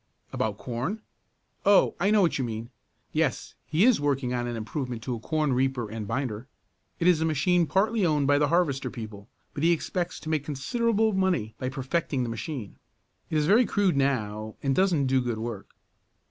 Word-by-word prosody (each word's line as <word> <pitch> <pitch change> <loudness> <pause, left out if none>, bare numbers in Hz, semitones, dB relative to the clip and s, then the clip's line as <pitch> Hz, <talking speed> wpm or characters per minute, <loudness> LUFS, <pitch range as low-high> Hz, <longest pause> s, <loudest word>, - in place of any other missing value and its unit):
"About 105 -2 -1
corn? 130 - -3 0.6
Oh, 200 -1 +5
I 195 - +2
know 210 -2 +5
what 165 - +1
you - - 0
mean. 115 -1 -5 0.4
Yes, - - 0
he 165 +7 +3
is 250 - +4
working 135 -3 0
on 120 -1 -1
an 120 - -3
improvement 120 +1 -4
to 125 - -3
a 115 - -4
corn 155 +3 0
reaper 125 -3 0
and 110 -2 -5
binder. 125 -1 -3 0.5
It 165 - 0
is 175 -3 +4
a - - +3
machine 160 +2 +2
partly 210 +4 +1
owned 150 -4 +2
by 145 +1 +4
the 145 - +3
harvester 145 -7 +1
people, 110 -4 -9 0.2
but 145 - -5
he 165 +2 +4
expects 175 +1 -2
to 155 - -6
make 155 -3 0
considerable 220 - 0
money 185 - 0
by 130 - -2
perfecting 135 0 -1
the 120 - -3
machine. 115 -1 -5 0.5
It 155 - 0
is 150 - +2
very 220 +8 +5
crude 200 -5 +2
now, 110 -6 -1
and 135 -1 +1
doesn't 180 -7 +3
do 130 0 +2
good 120 -2 -2
work." 110 -3 -5
140 Hz, 190 wpm, -27 LUFS, 120-175 Hz, 0.6 s, Oh